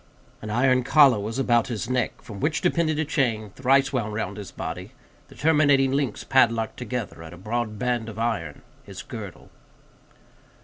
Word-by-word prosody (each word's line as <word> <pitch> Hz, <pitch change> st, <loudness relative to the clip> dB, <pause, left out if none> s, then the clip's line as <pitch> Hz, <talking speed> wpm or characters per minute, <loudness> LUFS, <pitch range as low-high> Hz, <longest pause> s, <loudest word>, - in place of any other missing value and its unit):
An 110 Hz, -, -6 dB
iron 130 Hz, +3 st, +3 dB
collar 135 Hz, -4 st, +5 dB
was 110 Hz, +4 st, -4 dB
about 120 Hz, -3 st, +2 dB
his 115 Hz, -3 st, -4 dB
neck, 125 Hz, -1 st, -2 dB
from 105 Hz, -3 st, -9 dB
which 155 Hz, +5 st, 0 dB
depended 170 Hz, -3 st, +1 dB
a 160 Hz, -, 0 dB
chain, 115 Hz, -9 st, -1 dB
thrice 135 Hz, +3 st, +2 dB
wound 110 Hz, -5 st, -2 dB
round 110 Hz, -, -3 dB
his 100 Hz, -3 st, -7 dB
body; -, -, -6 dB, 0.3 s
the -, -, -16 dB
terminating 145 Hz, -3 st, +3 dB
links 135 Hz, -5 st, -1 dB
padlocked 115 Hz, -4 st, +2 dB
together 125 Hz, -7 st, -5 dB
at 80 Hz, +1 st, -10 dB
a -, -, -11 dB
broad 110 Hz, +3 st, -3 dB
band 120 Hz, -1 st, -1 dB
of 110 Hz, -, -10 dB
iron, 110 Hz, -10 st, -3 dB, 0.2 s
his -, -, -9 dB
girdle. -, -, -9 dB
120 Hz, 170 wpm, -25 LUFS, 110-135 Hz, 0.3 s, collar